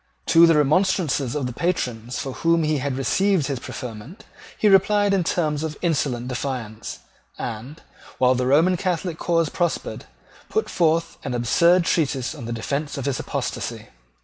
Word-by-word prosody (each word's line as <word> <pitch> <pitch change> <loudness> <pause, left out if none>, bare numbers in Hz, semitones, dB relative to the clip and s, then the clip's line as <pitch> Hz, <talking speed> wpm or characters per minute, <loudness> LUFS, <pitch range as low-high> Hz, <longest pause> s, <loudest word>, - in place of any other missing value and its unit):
To 170 +1 +8
the 165 - +5
remonstrances 150 -3 +1
of 145 -3 -1
the 125 - -4
patrons 125 -7 -2
from 135 - -4
whom 165 +2 +2
he 155 -1 +1
had 135 -1 -2
received 190 +4 +2
his 135 -3 -3
preferment 125 - -8 0.3
he 215 - +2
replied 205 +1 +4
in 190 -2 +2
terms 155 -3 0
of 155 -2 -4
insolent 140 -7 0
defiance, 120 -4 -5 0.4
and, 125 +7 -6 0.3
while 125 0 +4
the 125 0 -1
Roman 165 +7 +4
Catholic 175 -2 -2
cause 165 -3 +1
prospered, 175 -2 -2 0.4
put 440 - -1
forth 165 -1 +1
an 130 -3 -3
absurd 170 +9 +3
treatise 140 -7 0
in 140 -7 -8
defence 140 +6 -3
of 135 - -4
his 140 -2 -1
apostasy. - - -4
150 Hz, 155 wpm, -23 LUFS, 130-170 Hz, 0.4 s, To